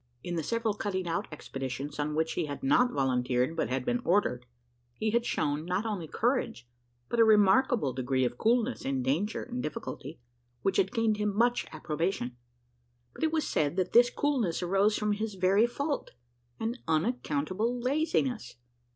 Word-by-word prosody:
In 175 - -4
the 165 - 0
several 230 +5 -1
cutting 190 -3 -3
out 165 - -1
expeditions, 135 -1 -5
on 150 +1 -1
which 160 +1 0
he - - -1
had 145 -1 -6
not 245 - +4
volunteered 125 +1 +1
but - - -1
had 130 0 -2
been 245 0 0
ordered, 125 -10 +1 0.5
he 215 - -1
had 235 +1 +1
shown, 145 +1 0
not 180 +5 -1
only 200 -7 -3
courage, 230 - -1 0.4
but 235 - -2
a - - +8
remarkable 210 - +4
degree 130 0 0
of 120 - -2
coolness 235 - +1
in 135 -1 -1
danger 165 - 0
and 250 0 -5
difficulty, 165 - -6 0.4
which 195 -1 +1
had 190 - +2
gained 225 -3 +1
him 210 -1 -1
much 240 +2 +2
approbation; 155 -4 -2 0.8
but - - -7
it 315 - +2
was 315 -1 0
said, 150 +1 0
that 185 -1 -1
this 240 +1 +7
coolness 240 - 0
arose 195 +4 +2
from 210 0 0
his 210 0 -2
very 190 +5 +4
fault 280 +4 -3 0.5
an 230 +3 -2
unaccountable 185 - 0
laziness. 265 - 0
195 Hz, 170 wpm, -29 LUFS, 150-235 Hz, 0.8 s, a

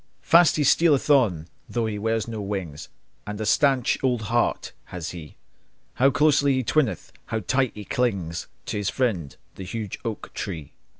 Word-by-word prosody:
Fast 170 -1 +6
he 150 - +1
stealeth 150 0 +4
on, 100 - +3 0.2
though 120 -1 -1
he 105 -2 -3
wears 110 0 -1
no 110 -2 -5
wings, 95 -7 -5 0.4
And 105 0 -5
a 110 - -2
staunch 135 +3 +2
old 125 -4 +1
heart 120 - +1
has 85 -2 -6
he! 80 -4 -10 0.6
How 135 +3 +4
closely 145 -1 +3
he 130 - 0
twineth, 130 0 0 0.2
how 110 -1 -2
tight 130 +6 0
he 105 -1 -8
clings 95 -10 -1 0.2
To - - -3
his 105 -1 -1
friend, 100 - -1 0.2
the 95 - -6
huge 105 +1 -5
oak 115 -3 -5
tree! 80 -8 -6
110 Hz, 170 wpm, -24 LUFS, 95-130 Hz, 0.6 s, Fast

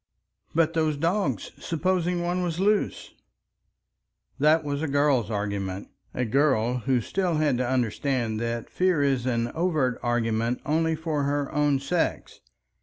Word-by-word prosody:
"But 165 0 +3
those 155 -3 +1
dogs! 180 +7 -1
Supposing 175 +1 0
one 175 +1 -1
was 175 -1 -2
loose!" 205 +2 0 1.3
That 155 +3 +4
was 145 0 -3
a 160 - -1
girl's 140 -5 +2
argument, 100 -2 -3 0.2
a 125 - -2
girl 125 -1 +2
who 125 +1 +1
still 180 - -1
had 150 -5 +1
to 125 -1 0
understand 125 -2 0
that 115 0 -3
fear 180 -5 +2
is 135 -3 +1
an 120 -1 0
overt 155 -7 0
argument 115 0 0
only 160 +2 +1
for 155 -2 -2
her 145 0 -1
own 145 -1 +2
sex. 165 +5 -2
145 Hz, 140 wpm, -26 LUFS, 120-165 Hz, 1.3 s, That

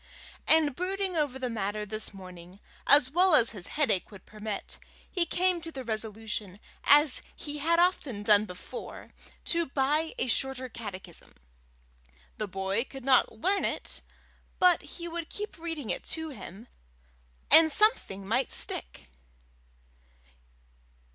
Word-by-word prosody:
and 310 -4 +4
brooding 380 +2 -2
over 290 -5 -1
the 260 -1 -3
matter 210 -2 -3
this 215 +1 -3
morning, 185 -1 -12 0.3
as 280 -2 +5
well 360 +1 +4
as 235 -5 +4
his 190 -5 -4
headache 275 -11 +1
would 200 -3 -14
permit, 210 -1 -6 0.3
he 350 -3 -1
came 365 -1 +1
to 330 0 -8
the 265 -4 -7
resolution, 215 -3 -5 0.3
as 290 -1 +9
he 295 -1 -6
had 335 +3 +1
often 300 - 0
done 205 0 +5
before, 180 -2 -9 0.3
to 335 -1 0
buy 295 +4 0
a - - 0
Shorter 260 +1 -1
Catechism; 195 -7 -9 1.0
the 215 - -2
boy 195 +3 -2
could 270 -1 -11
not 265 -2 +4
learn 380 - -1
it, - - -4 0.6
but 360 -1 +4
he 345 -1 -8
would 335 -1 -6
keep 420 -4 -7
reading 320 -7 -4
it - - -4
to 320 0 -5
him, 220 - -11 0.8
and 320 -1 +8
something 290 - +1
might 235 +6 0
stick. 60 - -4
260 Hz, 135 wpm, -28 LUFS, 210-325 Hz, 1.0 s, as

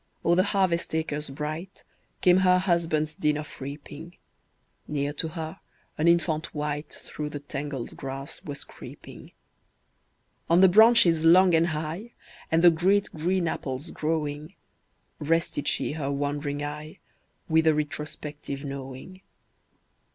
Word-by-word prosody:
O'er 170 - +4
the 180 - +5
harvest 185 -5 +1
acres 150 -2 -2
bright, 155 +6 -6 0.4
Came 180 0 +6
her 185 -1 +5
husband's 165 -4 0
din 150 -1 0
of 150 -2 -8
reaping; 145 +4 -8 0.7
Near 145 -1 -2
to 160 - -2
her, 160 0 -6 0.4
an 155 - +1
infant 170 -2 +1
wight 150 0 -3
Through 150 -1 -6
the 145 - -6
tangled 140 -3 -6
grass 135 +1 -6
was 145 -1 -6
creeping. - - -12 1.2
On 170 +1 +5
the 190 - +9
branches 185 -5 +6
long 180 +2 +6
and 165 +1 +4
high, 160 +8 -4 0.4
And 165 +1 +2
the 175 - +9
great 190 +5 +2
green 175 +3 0
apples 140 +1 -4
growing, 155 +1 -3 0.6
Rested 165 -1 0
she - - +1
her 145 -2 -3
wandering 145 +1 -2
eye, 150 +1 -6 0.5
With 160 0 +3
a 155 - +5
retrospective 150 -1 -5
knowing. 140 +6 -8
155 Hz, 130 wpm, -26 LUFS, 145-170 Hz, 1.2 s, the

